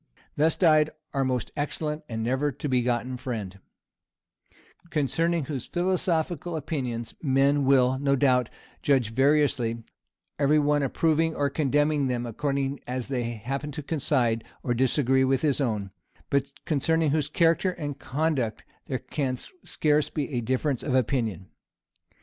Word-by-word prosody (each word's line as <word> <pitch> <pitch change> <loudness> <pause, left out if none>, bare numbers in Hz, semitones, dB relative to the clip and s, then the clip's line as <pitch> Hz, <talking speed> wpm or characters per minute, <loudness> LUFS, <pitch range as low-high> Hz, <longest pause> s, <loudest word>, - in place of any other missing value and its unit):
Thus 155 +2 +3
died 155 -3 +4 0.2
our 135 -1 +1
most 125 -2 -1
excellent 150 +1 -3
and 110 -1 -3
never 130 +5 0
to 145 - -5
be 130 -2 +2
forgotten 125 +1 -1
friend; 105 -7 -5 1.3
concerning 165 +2 0
whose 135 -4 -5
philosophical 175 -2 0
opinions 125 -7 -3
men 140 0 +3
will, 130 -1 +4
no 140 0 +2
doubt, 125 -3 +3 0.3
judge 130 -6 +2
variously, 135 -4 +2 0.6
every 145 +1 +4
one 145 0 +3
approving 160 +3 +1
or 140 -1 0
condemning 145 0 +1
them, 120 -1 -1
according 140 +3 -2
as 125 0 -3
they 130 -3 -1
happen 125 +6 -4
to 150 0 -5
coincide 130 -7 +1 0.2
or 120 - 0
disagree 130 +1 +2
with 130 +1 +1
his 145 -2 +2
own; 105 -7 -1 0.4
but 140 -1 +2 0.2
concerning 160 +1 +1
whose 150 -1 0
character 165 +3 +3
and 145 -5 -5
conduct 135 -5 -1 0.2
there 130 - -1
can 130 0 -3 0.3
scarce 150 -1 +1
be 145 -3 -3
a 125 -3 -1
difference 130 +3 0
of 130 - -1
opinion. 115 -7 0
140 Hz, 140 wpm, -26 LUFS, 125-150 Hz, 1.3 s, died